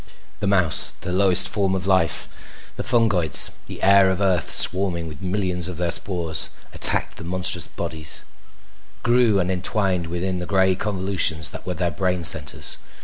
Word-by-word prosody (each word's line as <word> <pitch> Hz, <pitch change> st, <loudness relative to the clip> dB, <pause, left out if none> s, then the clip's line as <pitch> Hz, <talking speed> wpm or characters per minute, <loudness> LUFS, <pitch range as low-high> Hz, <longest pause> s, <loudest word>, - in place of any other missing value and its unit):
The 105 Hz, -, -3 dB
mouse, 95 Hz, -5 st, +2 dB
the 90 Hz, -, -6 dB
lowest 95 Hz, 0 st, +4 dB
form 95 Hz, -2 st, -1 dB
of 95 Hz, -1 st, -5 dB
life: 95 Hz, -4 st, -3 dB
the -, -, -6 dB
fungoids, 100 Hz, -, +3 dB, 0.2 s
the -, -, -10 dB
air 100 Hz, 0 st, +4 dB
of 95 Hz, 0 st, -3 dB
Earth 95 Hz, -4 st, -1 dB
swarming 90 Hz, -3 st, +5 dB
with 75 Hz, +1 st, -11 dB
millions 90 Hz, -2 st, -3 dB
of 90 Hz, -3 st, -8 dB
their 85 Hz, -1 st, -2 dB
spores, 85 Hz, -4 st, -2 dB, 0.2 s
attacked -, -, +3 dB
the -, -, -10 dB
monstrous 90 Hz, +1 st, -1 dB
bodies, 80 Hz, -3 st, -3 dB, 0.8 s
grew 120 Hz, -4 st, +2 dB
and 90 Hz, 0 st, -2 dB
entwined 95 Hz, -1 st, -1 dB
within 90 Hz, +2 st, -4 dB
the 90 Hz, -, -6 dB
gray 95 Hz, -1 st, +1 dB
convolutions 95 Hz, -6 st, -1 dB
that -, -, -10 dB
were 90 Hz, -, -4 dB
their 85 Hz, 0 st, -2 dB
brain 90 Hz, +2 st, -3 dB
centers. 75 Hz, -2 st, +1 dB
90 Hz, 160 wpm, -21 LUFS, 85-95 Hz, 0.8 s, swarming